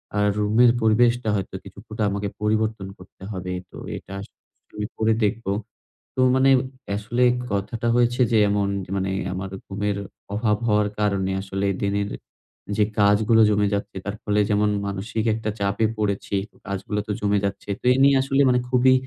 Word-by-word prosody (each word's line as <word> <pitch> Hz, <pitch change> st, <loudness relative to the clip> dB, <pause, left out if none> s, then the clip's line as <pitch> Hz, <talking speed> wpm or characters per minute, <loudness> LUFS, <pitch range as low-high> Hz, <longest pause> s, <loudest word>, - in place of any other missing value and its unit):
আ -, -, 0 dB, 0.2 s
রুমের 110 Hz, +4 st, +4 dB
পরিবেশটা 120 Hz, +1 st, +3 dB
হয়তো 95 Hz, -1 st, -3 dB
কিছুটা 105 Hz, +3 st, -6 dB
আমাকে 100 Hz, 0 st, -2 dB
পরিবর্তন 110 Hz, -2 st, 0 dB
করতে 95 Hz, +1 st, -16 dB
হবে। 90 Hz, -1 st, -4 dB, 0.2 s
তো -, -, -11 dB, 0.2 s
এটা -, -, -11 dB
আসলে 100 Hz, -, -13 dB, 0.4 s
আমি 105 Hz, 0 st, -3 dB
করে 110 Hz, 0 st, +2 dB
দেখব। 105 Hz, +3 st, 0 dB, 0.7 s
তো -, -, -5 dB, 0.2 s
মানে 130 Hz, +1 st, +4 dB, 0.5 s
আসলে 120 Hz, +4 st, 0 dB, 0.3 s
কথাটা 105 Hz, +4 st, -2 dB
হয়েছে 120 Hz, +1 st, +2 dB
যে 110 Hz, -, +4 dB
এমন 100 Hz, -1 st, +1 dB, 0.3 s
মানে 95 Hz, 0 st, -1 dB, 0.2 s
আমার 95 Hz, +1 st, -4 dB, 0.2 s
ঘুমের 100 Hz, +1 st, -2 dB, 0.4 s
অভাব 105 Hz, -1 st, +1 dB
হওয়ার 105 Hz, -1 st, +3 dB
কারণে 100 Hz, -2 st, +1 dB
আসলে 95 Hz, 0 st, -2 dB, 0.2 s
দিনের 100 Hz, 0 st, 0 dB, 0.7 s
যে 105 Hz, -, +5 dB, 0.2 s
কাজগুলো 105 Hz, +3 st, +4 dB
জমে 105 Hz, -1 st, +2 dB
যাচ্ছে, 100 Hz, -1 st, -3 dB
তার 100 Hz, -, -3 dB
ফলে 105 Hz, 0 st, +1 dB
যেমন 105 Hz, 0 st, +2 dB, 0.2 s
মানসিক 105 Hz, +3 st, -3 dB
একটা 110 Hz, -1 st, -3 dB
চাপে 100 Hz, +2 st, +1 dB
পড়েছি। 100 Hz, -1 st, -1 dB, 0.3 s
কাজগুলো 100 Hz, +1 st, -3 dB
তো 105 Hz, -, -2 dB
জমে 100 Hz, 0 st, +2 dB
যাচ্ছে। 100 Hz, +1 st, -4 dB
তো -, -, -14 dB
এ -, -, 0 dB
নিয়ে 140 Hz, 0 st, +6 dB
আসলে 135 Hz, +1 st, +1 dB
মানে 125 Hz, -, +3 dB
খুবই 130 Hz, +1 st, +5 dB
105 Hz, 160 wpm, -23 LUFS, 100-110 Hz, 0.7 s, নিয়ে